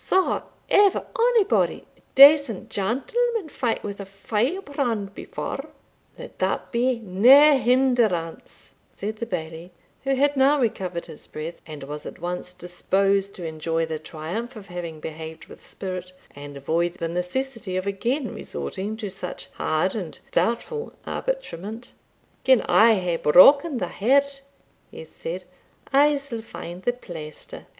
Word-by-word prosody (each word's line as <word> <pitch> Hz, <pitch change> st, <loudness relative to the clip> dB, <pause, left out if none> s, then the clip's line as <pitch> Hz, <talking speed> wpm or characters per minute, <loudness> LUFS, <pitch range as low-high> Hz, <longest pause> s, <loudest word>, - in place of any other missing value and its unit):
Saw 380 Hz, 0 st, +2 dB, 0.3 s
ever 405 Hz, -1 st, +4 dB
onybody 470 Hz, -3 st, +2 dB
a -, -, -28 dB
decent 280 Hz, -6 st, +7 dB
gentleman 410 Hz, -, -1 dB
fight 240 Hz, -5 st, -2 dB
wi' 205 Hz, -, -4 dB
a 200 Hz, -, -6 dB
firebrand 230 Hz, -, -2 dB
before?" -, -, -6 dB, 0.5 s
"Let -, -, -11 dB
that -, -, -1 dB
be 245 Hz, +1 st, +1 dB
nae 250 Hz, +9 st, +6 dB
hinderance," 235 Hz, -9 st, 0 dB, 0.2 s
said 215 Hz, +2 st, -5 dB
the 235 Hz, -, -4 dB
Bailie, 165 Hz, -2 st, -5 dB, 0.3 s
who 270 Hz, 0 st, +1 dB
had 285 Hz, +2 st, +2 dB
now 275 Hz, +2 st, +4 dB
recovered 185 Hz, -8 st, -2 dB
his 160 Hz, -3 st, -12 dB
breath, 160 Hz, +2 st, -7 dB
and 150 Hz, -3 st, -8 dB
was 150 Hz, +2 st, -7 dB
at -, -, -9 dB
once 180 Hz, +1 st, -3 dB
disposed 195 Hz, +3 st, 0 dB
to 175 Hz, -, -6 dB
enjoy 165 Hz, +1 st, -1 dB
the 160 Hz, -1 st, -4 dB
triumph 170 Hz, +11 st, -6 dB
of 205 Hz, -2 st, -11 dB
having 170 Hz, -3 st, -6 dB
behaved 160 Hz, 0 st, -7 dB
with -, -, -15 dB
spirit, 185 Hz, -1 st, -6 dB, 0.2 s
and 145 Hz, 0 st, -9 dB
avoid 170 Hz, +5 st, -1 dB
the 170 Hz, -2 st, -3 dB
necessity 185 Hz, +4 st, -3 dB
of 185 Hz, -, -2 dB
again 240 Hz, +7 st, -2 dB
resorting 215 Hz, -1 st, -5 dB
to 215 Hz, -3 st, -5 dB
such 180 Hz, -1 st, -7 dB
hard 160 Hz, +4 st, 0 dB
and 185 Hz, -8 st, -5 dB
doubtful 445 Hz, -, -1 dB
arbitrament 240 Hz, -, -4 dB, 0.5 s
"Gin 260 Hz, -2 st, +5 dB
I 225 Hz, +1 st, +5 dB
hae 180 Hz, -3 st, -1 dB
broken 275 Hz, -, +6 dB
the 185 Hz, -, -1 dB
head," 275 Hz, +5 st, +2 dB, 0.5 s
he -, -, -10 dB
said, -, -, -6 dB, 0.5 s
"I 290 Hz, +2 st, +5 dB
sall 275 Hz, -5 st, -5 dB
find 180 Hz, -5 st, -9 dB
the 245 Hz, -, 0 dB
plaister. 160 Hz, -10 st, -10 dB
210 Hz, 140 wpm, -24 LUFS, 175-270 Hz, 0.5 s, decent